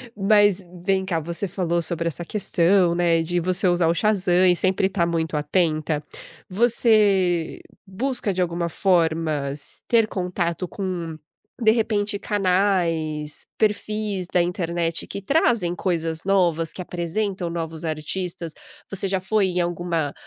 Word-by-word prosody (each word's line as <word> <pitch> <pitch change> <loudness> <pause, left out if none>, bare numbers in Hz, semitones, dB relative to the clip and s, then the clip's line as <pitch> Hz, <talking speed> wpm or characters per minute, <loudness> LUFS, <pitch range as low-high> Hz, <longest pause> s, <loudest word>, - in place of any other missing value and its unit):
Mas, 205 -1 +3 0.2
vem 190 0 +1
cá, 170 -3 -1
você 170 +5 -3
falou 175 -2 -1
sobre 170 0 -2
essa 170 +1 -3
questão, 180 -2 +2
né, 170 -1 +2
de 175 +2 0
você 185 +2 +1
usar 175 -1 +3
o 165 - +3
Shazam 185 -2 +2
e 180 - +5
sempre 190 +1 +2
estar 190 -3 0
muito 165 -2 -1
atenta, 155 -1 0 0.5
você 200 -5 +2 0.3
busca 215 +2 -2
de 185 - -1
alguma 170 -1 -1
forma 165 -5 +1
s 145 +1 -6
ter 225 -2 +4
contato 180 -2 -2
com, 175 -4 -4 0.4
de 220 -1 +5
repente, 210 -2 0
canais, 180 -7 0
perfis 210 -2 -1
da 180 - +4
internet 170 -1 -1
que 200 - -6
trazem 225 - +2
coisas 165 -3 -2
novas, 175 -5 +2
que - - -6
apresentam 180 +1 -3
novos 165 -1 -5
artistas? 165 +2 -4 0.4
Você 195 0 -2
já 190 0 0
foi 195 +1 +1
em 180 -1 0
alguma 170 -3 -2
180 Hz, 140 wpm, -23 LUFS, 165-195 Hz, 0.5 s, e